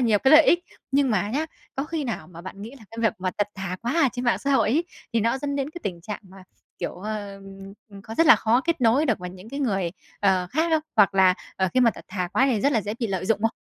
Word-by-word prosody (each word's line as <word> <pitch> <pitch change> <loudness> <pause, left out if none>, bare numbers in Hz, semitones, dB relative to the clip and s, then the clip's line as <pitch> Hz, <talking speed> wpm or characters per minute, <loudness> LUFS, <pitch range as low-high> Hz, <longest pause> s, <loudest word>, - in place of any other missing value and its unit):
nhiều 225 -4 +3
cái 265 - +3
lợi 310 +1 +9
ích. 350 +1 +3 0.3
Nhưng 275 -1 +3
mà 205 -2 +1
nhá, 295 +7 -1 0.3
có 270 - -1
khi 315 -1 -3
nào 225 -10 -4
mà 170 -1 -11
bạn 190 +2 -9
nghĩ 220 - -7
là 225 - -15
cái 225 - -10
việc 220 - +3
mà 185 0 -1
thật 205 0 +1
thà 190 -2 -4
quá 240 +2 -1
ở - - +4
trên 250 0 -4
mạng 240 - +2
xã 280 - -1
hội 270 - +3
ấy, 315 +8 +2 0.3
thì 230 - +2
nó 230 +4 +1
dẫn 280 0 -3
đến 275 +1 -2
cái 345 - -9
tình 175 -3 -4
trạng 210 +4 -6
mà, 190 -1 -15 0.3
kiểu, - - -3
ờ, 205 0 -6 0.6
có 225 - -7
rất 330 - +3
là - - +9
khó 230 +3 +2
kết 335 -3 0
nối 250 +7 +4
được 225 - +1
với 180 -1 -6
những 185 +3 -12
cái 280 +2 -4
người, 195 -9 0 0.3
ờ, 190 -3 +2
khác 320 +4 +1
không? 315 -1 +2
Hoặc 200 -2 +5
là, 190 -1 +5 0.2
ờ, 190 -1 +1
khi 255 - +4
mà 240 -2 +5
thật - - -12
thà 185 -2 -3
quá 265 - +3
thì 240 -6 +1
rất 280 +5 +2
là 230 - +2
dễ 210 +1 -4
bị 230 - +1
lợi 190 -2 -3
dụng 215 -1 +1
không? 225 - +3
225 Hz, 290 wpm, -24 LUFS, 195-270 Hz, 0.6 s, lợi